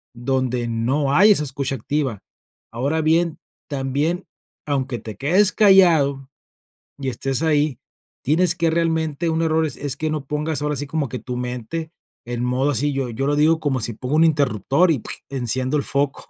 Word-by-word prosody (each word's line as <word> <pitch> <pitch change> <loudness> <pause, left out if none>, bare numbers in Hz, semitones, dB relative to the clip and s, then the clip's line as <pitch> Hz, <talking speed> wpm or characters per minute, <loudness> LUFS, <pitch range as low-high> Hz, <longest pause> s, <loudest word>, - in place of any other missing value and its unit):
donde 125 -1 -1
no 130 +5 0
hay 205 +8 +6
esa 170 -7 +3
escucha 135 0 -3
activa. 130 -3 -2 0.5
Ahora 140 +7 -1
bien, 165 +1 +1 0.3
también 145 +6 -1 0.4
aunque 135 -4 -1
te 110 -1 -8
quedes 185 - +3
callado 165 -10 +4 0.7
y 135 -1 -2
estés 135 +3 -2
ahí, 150 -4 +1 0.4
tienes 170 +3 +2
que 170 -2 +1
realmente 160 -1 0
un 160 0 0
error 160 0 +2
es 145 - -4
es 140 -2 -4
que 155 +1 -2
no 155 -2 -3
pongas 150 +2 -2
ahora 150 0 -1
sí 145 - -3
como 145 -2 -2
que 125 - -4
tu 125 -1 -5
mente 125 +6 -4 0.3
en 120 0 -3
modo 130 +3 +1
así 145 +2 0
yo 135 -2 -2
yo 120 +4 -3
lo 145 - +2
digo 155 +2 +3
como 145 -4 -1
si 115 +2 -2
pongo 125 +5 -5
un 160 - +5
interruptor 140 - +2
y 145 - 0
¡puig!, - - -3
enciendo 130 +1 -1
el 140 - -1
foco 140 0 -1
140 Hz, 180 wpm, -21 LUFS, 130-160 Hz, 0.7 s, hay